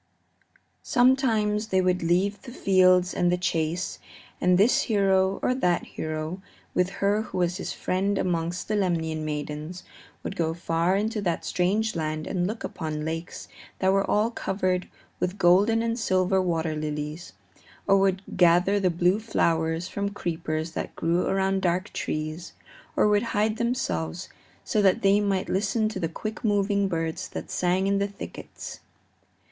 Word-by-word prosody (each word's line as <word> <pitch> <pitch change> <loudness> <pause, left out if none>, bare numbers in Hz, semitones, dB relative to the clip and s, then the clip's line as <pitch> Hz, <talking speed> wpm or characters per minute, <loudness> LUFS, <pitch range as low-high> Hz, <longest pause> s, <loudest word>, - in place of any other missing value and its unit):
Sometimes 225 -5 +2
they 190 -3 +2
would 180 0 +1
leave 190 +4 +1
the 245 - -10
fields 185 -4 +4
and 175 0 +2
the 180 - +2
chase, 170 0 -1 0.4
and 180 0 +4
this 210 +6 +4
hero 195 -2 +3
or 255 - +3
that 180 -9 +1
hero, 155 +3 -4 0.3
with 180 0 +2 0.2
her 205 +2 +3
who 220 - -6
was 175 0 +1
his - - -4
friend 195 +2 -1
amongst 175 -1 -1
the 215 - 0
Lemnian 165 -5 0
maidens, 150 +3 -5 0.4
would - - -4
go 165 -3 -1
far 170 +2 +1
into 215 +1 -1
that 175 -4 -1
strange 210 +4 0
land 155 -1 -2
and 180 -1 -1
look 220 +3 -5
upon 155 -2 -4
lakes 165 +2 -5 0.3
that 190 0 +2
were 195 0 +3
all 215 +3 +2
covered 185 -4 -1 0.3
with 180 +2 -2
golden 200 +5 +4
and 230 +1 -1
silver 185 -2 +2
water 165 -3 -1
lilies, 150 +2 -4 0.5
or 195 0 +4
would 195 0 +1
gather 180 +3 +4
the 185 -2 +2
blue 180 +4 +2
flowers 165 -5 0
from 200 +1 -2
creepers 160 -4 -3
that - - -5
grew 170 +2 +1
around 195 0 +1
dark 185 +2 0
trees, 155 +3 -4 0.4
or - - +4
would 210 0 +3 0.2
hide 215 +1 +1
themselves 230 - -2 0.3
so 215 - +1
that 195 +3 +3
they 200 +1 +5
might 195 -2 0
listen 210 +3 +1
to 215 -3 -4
the 165 -3 -1
quick 215 +6 -6
moving 200 -2 +2
birds 165 -3 -3
that - - -7
sang 180 +1 +1
in 200 0 +2
the 200 - +1
thickets. 200 0 -9
185 Hz, 160 wpm, -26 LUFS, 170-200 Hz, 0.5 s, they